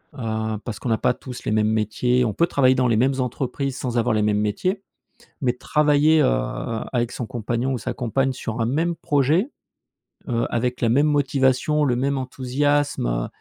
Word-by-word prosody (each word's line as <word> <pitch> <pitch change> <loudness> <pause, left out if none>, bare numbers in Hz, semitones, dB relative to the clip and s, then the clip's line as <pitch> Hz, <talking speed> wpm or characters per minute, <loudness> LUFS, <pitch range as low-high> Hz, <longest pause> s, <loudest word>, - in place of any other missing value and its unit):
heu, 110 -3 -3
parce 115 -5 -4
qu'on 125 - -4
n'a 110 - +2
pas 125 - +2
tous 125 0 -10
les - - -1
mêmes 110 0 +2
métiers. 110 +4 +1
On 110 - -1
peut 170 - +2
travailler 130 -5 +3
dans 130 -1 +2
les 115 - +2
mêmes 130 +4 +3
entreprises 130 +1 -2
sans 125 -1 -3
avoir 115 -1 +2
les 110 - +1
mêmes 105 0 +1
métiers, 185 - -1 0.6
mais 125 -3 +2
travailler, 150 +4 +3
heu, - - +4 0.7
avec 120 -1 0
son 120 - -4
compagnon 120 +2 -2
ou - - -1
sa - - -4
compagne 130 +3 0
sur 115 -2 -4
un 115 - +1
même 165 +7 0
projet, 155 - +1 0.8
heu, 115 -1 0
avec 125 +1 -1
la 115 - +2
même 145 +6 +3
motivation, 145 +1 +2
le 125 -3 +1
même 135 +2 0
enthousiasme, 135 - 0
heu, - - -1
125 Hz, 190 wpm, -22 LUFS, 115-140 Hz, 0.8 s, heu